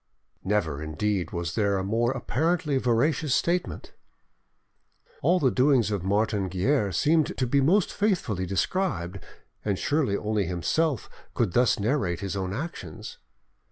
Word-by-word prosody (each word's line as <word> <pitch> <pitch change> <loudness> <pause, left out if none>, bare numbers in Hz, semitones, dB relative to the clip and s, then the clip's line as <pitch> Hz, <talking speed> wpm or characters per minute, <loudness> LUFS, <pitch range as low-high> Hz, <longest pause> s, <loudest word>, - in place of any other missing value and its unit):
Never, 90 -8 0
indeed, 90 +5 -1
was 85 -1 -4
there 100 -3 +1
a 95 - -2
more 115 +4 +1
apparently 150 +3 0
veracious 130 +4 +1
statement! 175 +1 -1 1.3
All 180 - +3
the 130 -5 +3
doings 130 -4 +3
of 100 -4 -2
Martin 100 0 +1
Guerre 100 - +1
seemed 155 - +2
to 130 - +1
be 140 +3 +2
most 175 +8 +3
faithfully 145 - 0
described, 95 - -1 0.4
and 100 -3 0
surely 140 -8 0
only 105 -3 -1
himself 120 - 0 0.3
could 105 -7 0
thus 125 +2 +3
narrate 100 - 0
his 100 0 -3
own 95 -1 -2
actions. 105 - -6
110 Hz, 135 wpm, -26 LUFS, 95-145 Hz, 1.3 s, All